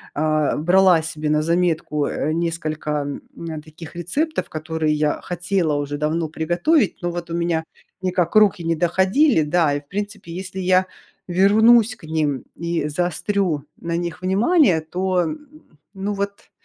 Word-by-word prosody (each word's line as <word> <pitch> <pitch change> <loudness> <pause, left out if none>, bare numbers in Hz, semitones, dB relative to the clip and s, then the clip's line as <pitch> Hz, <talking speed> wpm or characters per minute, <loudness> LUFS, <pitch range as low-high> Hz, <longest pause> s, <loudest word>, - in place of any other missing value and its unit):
э, 155 0 +1
брала 180 +1 +4
себе 155 -1 -4
на 150 0 +2
заметку, 165 -3 0
э, 150 +2 -2
несколько, 160 -2 -2 0.4
м, 160 -2 -6
таких 155 +1 -12
рецептов, 285 - -2
которые 155 0 -1
я 150 0 0
хотела 175 -2 -1
уже 145 0 -2
давно 155 +2 -1
приготовить, 175 - +1
но 175 0 -1
вот 170 0 -6
у - - -1
меня 170 -1 0 0.4
никак 180 -1 0
руки 205 -5 +5
не 165 0 0
доходили. 190 - +3
Да, 155 0 +2
и, 145 - -2
в 145 - -33
принципе, 205 -1 -5
если 185 +2 -6
я 185 0 +3 0.4
вернусь 220 +5 +5
к - - -25
ним 155 -4 -1
и 170 -2 -2
заострю 175 -1 -1 0.2
на 170 0 -2
них 170 0 -4
внимание, 195 - +3
то, 180 +2 0 0.7
ну 195 +2 -2
вот, 200 0 -5
170 Hz, 150 wpm, -21 LUFS, 155-190 Hz, 0.7 s, руки